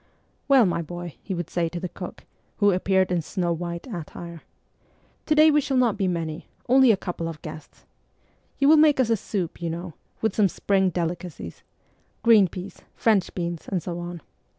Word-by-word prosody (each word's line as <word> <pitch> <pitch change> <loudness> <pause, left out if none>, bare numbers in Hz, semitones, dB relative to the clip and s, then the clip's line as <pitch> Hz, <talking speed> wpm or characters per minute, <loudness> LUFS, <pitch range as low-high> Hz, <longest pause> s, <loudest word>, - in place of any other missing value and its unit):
' - - -42
Well, 270 -5 +6
my 170 -2 0
boy,' 175 0 -7
he 190 - -4
would 175 -2 -4
say 170 -1 -1
to 175 - -5
the 180 - -3
cook, - - -9 0.3
who 205 -1 +4
appeared 190 0 +1
in 175 -2 +1
snow 175 +1 -1
white 170 0 -5
attire, 170 -5 -8 0.4
' - - -37
to 305 - +3
day 310 +1 +7
we 295 0 +4
shall 275 -1 -1
not 240 -4 +3
be 200 -2 0
many: 165 -3 -3 0.2
only 260 0 +6
a 205 - +2
couple 175 -3 -4
of 165 -2 -6
guests. 155 -1 -10 0.7
You 275 - +3
will 310 +1 +7
make 300 -2 +5
us 240 -3 +2
a - - +5
soup, 190 -5 -4
you 170 - -2
know, 170 +1 -5 0.3
with 220 - -1
some 205 -3 +4
spring 190 +1 +1
delicacies 170 - -5 0.6
green 220 -4 +6
peas, 180 +3 -9
French 210 -5 +2
beans, 170 -2 -4
and 180 -5 -2
so 175 -1 -4
on. 175 -1 -6
180 Hz, 195 wpm, -25 LUFS, 170-220 Hz, 0.7 s, day